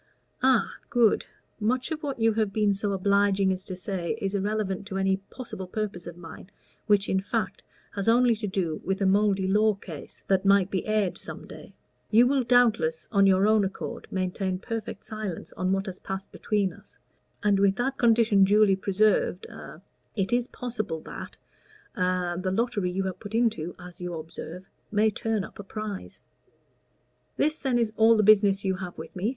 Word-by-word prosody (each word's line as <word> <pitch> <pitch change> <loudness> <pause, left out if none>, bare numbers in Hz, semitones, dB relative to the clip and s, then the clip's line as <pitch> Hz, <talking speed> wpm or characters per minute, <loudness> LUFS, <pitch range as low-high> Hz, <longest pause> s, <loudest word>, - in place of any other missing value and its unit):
"Ah 255 -5 +4 0.2
good. 235 -3 +3 0.3
Much 250 +8 0
of 310 -1 -3
what 280 -5 -4
you 225 0 +3
have 215 -2 0
been 210 -1 +2
so 200 +1 -2
obliging 200 0 +2
as 185 0 -6
to 185 - -5
say 185 +1 -3
is 195 -3 -2
irrelevant 200 -1 -2
to 195 -3 -4
any 190 0 +2
possible 195 -1 -8
purpose 200 -3 -4
of 170 0 -8
mine, 170 +2 -11 0.4
which, 205 -2 +3
in 190 - +1
fact, 205 0 -2 0.3
has 200 0 -4
only 240 0 +5
to 210 -1 -3
do 180 -5 -2
with 190 +1 -1
a 195 - +1
mouldy 195 0 +3
law 210 +2 +3
case 170 -7 -10
that 190 -1 +2
might 195 -1 +4
be 190 - -2
aired 215 -4 0
some - - -8
day. - - -12 0.3
You 230 +3 +6
will 270 +1 +2
doubtless, 230 -10 +2
on 200 -2 +5
your 190 +1 +4
own 215 -1 +4
account, 195 0 -5
maintain 185 0 -2
perfect 220 0 -5
silence 215 -5 -6
on 185 +1 -1
what 195 0 0
has 190 -3 -7
passed 190 +1 -6
between 205 -3 -1
us, - - -18 0.5
and 205 -2 +3
with 195 -1 +4
that 265 +4 -2
condition 225 -4 +4
duly 205 0 +5
preserved 195 -1 +1
a - - -11 0.3
it 195 +2 -1
is 245 0 +2
possible 215 -12 -4
that - - -9 0.6
a 180 -1 0
the 185 - -1
lottery 205 -2 0
you 190 +2 -1
have 190 -1 -4
put 205 +1 -7
into 220 -8 0
as 180 -1 -11
you 175 -1 -4
observe 165 +3 -8 0.2
may 215 +1 +3
turn 220 -1 -1
up - - -11
a - - -5
prize." 210 0 -7 1.2
"This, 310 +2 +1
then, 260 -3 +1
is 230 -2 0
all 225 +1 +6
the 215 - +3
business 200 -1 +5
you 190 -1 0
have 180 -2 -7
with - - -9
me?" 190 +4 -1
200 Hz, 185 wpm, -27 LUFS, 190-220 Hz, 1.2 s, You